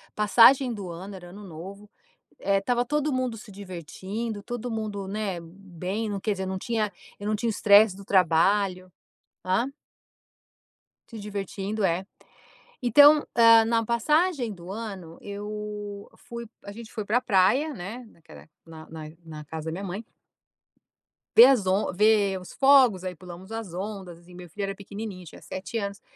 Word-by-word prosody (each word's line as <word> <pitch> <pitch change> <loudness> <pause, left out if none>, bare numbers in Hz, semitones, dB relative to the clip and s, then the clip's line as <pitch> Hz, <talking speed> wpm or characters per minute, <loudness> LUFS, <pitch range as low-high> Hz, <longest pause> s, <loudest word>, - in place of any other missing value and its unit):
passagem 235 +4 +5
do 195 -4 -6
ano, 190 +4 -8
era 175 -1 -11
ano 205 +3 -11
novo, 195 +4 -10 0.5
eh, 195 0 +1
estava 245 +4 0
todo 300 +2 0
mundo 255 -3 -1
se 215 - -12
divertindo, 200 +4 -6
todo 240 +1 -5
mundo, 210 -3 -4
né, 200 -4 -3
bem, 190 +4 -5
não 200 -1 -3
quer 215 - 0
dizer, 190 -1 -4
não 190 0 -3
tinha, 215 -1 -1 0.3
eu 205 - -6
não 215 - +1
tinha 230 +2 -1
estresse 205 -1 +5
do 200 - -11
trabalho. 185 +1 +2 0.6
Hã? 190 +8 +1 1.4
Se 225 -2 -9
divertindo, 205 0 -4
é. 185 +1 +1 0.8
Então, 290 +5 +7
hã, 230 -1 +7
na 230 0 +1
passagem 270 - +1
do 180 0 -10
ano, 195 -7 -7
eu 205 0 -6
fui 235 -1 -8 0.2
a 200 - -8
gente 225 +1 -11
foi 220 - -4
pra 235 +4 +2
praia, 250 +10 +3
né, 225 +5 -7
naquela 165 - -16 0.2
na 160 -1 -12
na 160 -1 -8 0.2
na 155 -2 -9
casa 160 +1 -7
da 160 - -3
minha 190 +4 -5
mãe 195 +4 -5 1.3
ver 235 +3 +11
as 245 -8 +3
on 190 +3 +1
ver 205 -1 +3
os 180 - -12
fogos, 265 -9 +5
aí 185 -1 -4
pulamos 180 +3 -11
as 225 -6 -6
ondas, 185 -3 -7
e 180 - -15
meu 175 -1 -11
filho 200 +5 -5
era 195 0 -3
pequenininho, 200 -2 -8
tinha 160 - -13
7 190 +5 -6
anos. 200 -1 -4
205 Hz, 165 wpm, -26 LUFS, 185-225 Hz, 1.4 s, ver